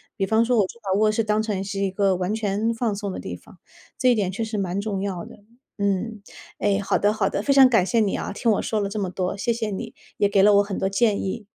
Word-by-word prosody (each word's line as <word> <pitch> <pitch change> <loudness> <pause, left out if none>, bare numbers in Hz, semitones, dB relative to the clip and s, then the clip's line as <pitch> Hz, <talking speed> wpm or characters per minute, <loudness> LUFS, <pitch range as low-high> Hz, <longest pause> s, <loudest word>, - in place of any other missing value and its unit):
比 195 - 0
方 220 +3 +2
说， 245 0 +2
我 200 - +4
就 235 - -11
把 195 -2 0
卧 215 0 +3
室 225 +1 0
当 210 0 +1
成 210 -3 -2
是 195 0 -4
一 195 -1 0
个 195 0 +2
完 180 +3 -2
全 220 +1 -1
放 225 -2 -1
松 200 -1 -4
的 - - -6
地 - - -6
方， - - -17 0.4
这 255 -1 +3
一 - - +3
点 195 -4 0
确 205 +4 -3
实 220 -1 -4
蛮 190 -1 -2
重 200 -2 -3
要 190 -4 -4
的。 - - -15 0.3
嗯， 200 +2 -1 0.4
哎， 200 -1 +1
好 200 - 0
的 205 +1 +2
好 210 -3 0
的， - - -2
非 275 - +2
常 270 -1 +8
感 225 -7 +3
谢 230 +3 +1
你 205 -3 +1
啊， - - -4
听 230 +3 -1
我 210 - +1
说 220 - -1
了 200 - -1
这 205 +2 -6
么 190 -2 -2
多。 185 +1 -2
谢 220 +4 -1
谢 225 -2 -2
你， 225 +3 -5 0.2
也 205 - +2
给 200 -1 +3
了 205 +1 +6
我 200 - +5
很 200 -1 -5
多 190 - 0
建 200 +1 +1
议。 205 +2 -4
205 Hz, 305 characters per minute, -23 LUFS, 195-220 Hz, 0.4 s, 常